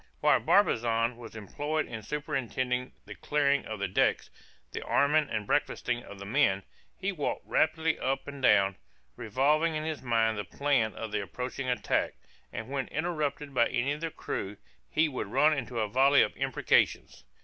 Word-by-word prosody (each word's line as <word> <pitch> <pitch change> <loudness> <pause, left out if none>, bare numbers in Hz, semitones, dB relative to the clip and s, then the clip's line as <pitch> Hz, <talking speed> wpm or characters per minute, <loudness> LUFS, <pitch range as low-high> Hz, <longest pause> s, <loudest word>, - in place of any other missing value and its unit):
While - - +4
Barbazan 115 +1 +2
was 115 -1 -11
employed 145 +9 -2
in 110 - -6
superintending 130 -2 -2
the - - -8
clearing 140 -2 +1
of 110 - -5
the 100 - -1
decks, 90 - +1 0.4
the - - -5
arming 150 +1 +2
and 105 -2 -2
breakfasting 120 +4 0
of 100 - -11
the 100 - -8
men, 100 -2 +2 0.3
he 195 +1 -1
walked 150 -7 -3
rapidly 160 0 +1
up 135 +1 -2
and 140 -1 -7
down, 100 -6 +4 0.4
revolving 150 +8 +1
in 155 - -2
his 155 -1 -4
mind 115 -3 +1
the - - -2
plan 130 -6 0
of 110 -2 -6
the 105 -1 -1
approaching 125 +6 -5
attack, 125 - 0 0.4
and 110 - -6
when 135 -1 -2
interrupted 150 -3 -2
by 120 -2 +4
any 125 +4 -1
of 150 +2 -4
the 165 - -2
crew, 100 -9 -5 0.3
he 155 +1 +2
would 130 -8 -4
run 150 +9 +3
into 125 -3 -4
a 110 - 0
volley 135 +5 +5
of - - -3
imprecations. - - +1
130 Hz, 170 wpm, -29 LUFS, 110-150 Hz, 0.4 s, volley